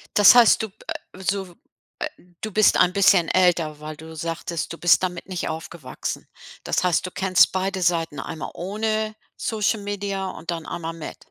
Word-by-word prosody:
Das 205 +3 +8
heißt, 235 -2 +7
du, - - -2 0.2
äh, 190 - -7
so 190 0 -1
w 175 - -18 0.4
äh, 305 - -2 0.3
du 215 - -4
bist 215 +1 +4
ein 180 0 +4
bisschen 195 -3 +5
älter, 170 -5 +2
weil 155 0 -7
du 160 +1 -11
sagtest, 165 +1 -4
du - - -8
bist 175 +1 +4
damit 180 -1 -3
nicht 180 -2 -3
aufgewachsen. 160 -4 -6 0.4
Das - - 0
heißt, 180 0 +2
du 185 - -5
kennst 185 -1 +4
beide 190 0 -1
Seiten, 165 -4 0
einmal 155 - -6
ohne 215 +3 -2 0.2
Social-Media 205 -3 -2
und 170 +1 -6
dann 165 -2 -5
einmal 165 -1 -5
mit? 165 -2 -8
180 Hz, 175 wpm, -23 LUFS, 165-200 Hz, 0.4 s, Das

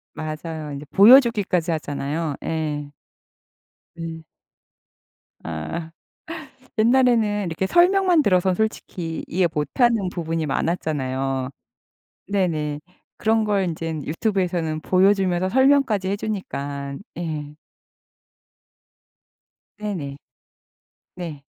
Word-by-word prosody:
맞아요. 155 -1 -5
인제 140 +1 -6
보여주기까지 205 -6 +6
하잖아요. 150 0 -2
예. 150 -2 -3 1.0
네. 165 -1 -6 1.2
아. 160 - -5 0.9
옛날에는 225 -3 +3
이렇게 170 +2 -2
설명만 360 - +4
들어선 185 -3 +3
솔직히 180 -5 -3
이해 180 +1 +2
못 150 -2 -1
하는 230 -7 +3
부분이 165 -2 -2
많았잖아요. 135 -4 -1 0.8
네네. 155 -7 0 0.4
그런 220 0 +2
걸 205 -2 +1
인젠 165 -3 -3
유튜브에서는 170 -2 -1
보여주면서 185 0 +3
설명까지 260 -5 +3
해주니깐. 140 -9 -4 0.2
예. 150 -3 -4 2.2
네네. 175 -10 -4 1.0
네. 160 -6 -7
170 Hz, 215 characters per minute, -23 LUFS, 150-205 Hz, 2.2 s, 보여주기까지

